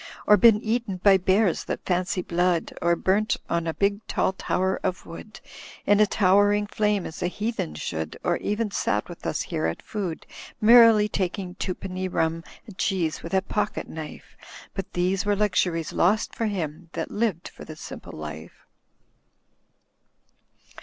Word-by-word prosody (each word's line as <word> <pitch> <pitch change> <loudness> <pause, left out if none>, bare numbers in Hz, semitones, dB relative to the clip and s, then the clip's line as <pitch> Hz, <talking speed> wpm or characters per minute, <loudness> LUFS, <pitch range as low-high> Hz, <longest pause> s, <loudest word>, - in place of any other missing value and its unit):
Or 210 - +7
been 220 -1 +5
eaten 225 -3 -1
by 195 +1 +5
bears 190 0 +2
that - - -5
fancy 180 0 0
blood. 175 -1 0
Or 170 +1 +3
burnt 200 +5 +1
on 170 0 0
a 165 - -1
big 200 0 +1
tall 190 - 0
tower 190 0 -1
of 185 -2 -3
wood. 210 +6 -10 0.5
In 205 0 +4
a 215 - +5
towering 205 +2 +3
flame 210 -1 0
as 160 - -8
a 175 - +1
heathen 210 - -3
should. 80 0 -4
Or - - +1
even 210 +1 -2
sat - - -1
with - - -8
us - - -1
here 80 - -2
at 80 - -4
food. 190 -7 -4 0.3
Merrily 225 -1 +7
taking 185 -2 -3
twopenny 185 0 -4
rum 165 -2 -1 0.2
and 210 -6 -13
cheese 175 -5 0
with 170 +3 -4
a 190 - +2
pocket 210 +1 -2
knife. 155 -1 -9 0.4
But 195 - -5
these 180 +2 0
were 205 0 +1
luxuries 180 -5 0
lost 205 +5 +2
for 225 - -1
him 170 -4 -4
that - - -4
lived 205 -6 -1
for - - -12
the 155 - -9
Simple - - -9
Life." 75 +1 -9
190 Hz, 160 wpm, -25 LUFS, 170-210 Hz, 0.5 s, Or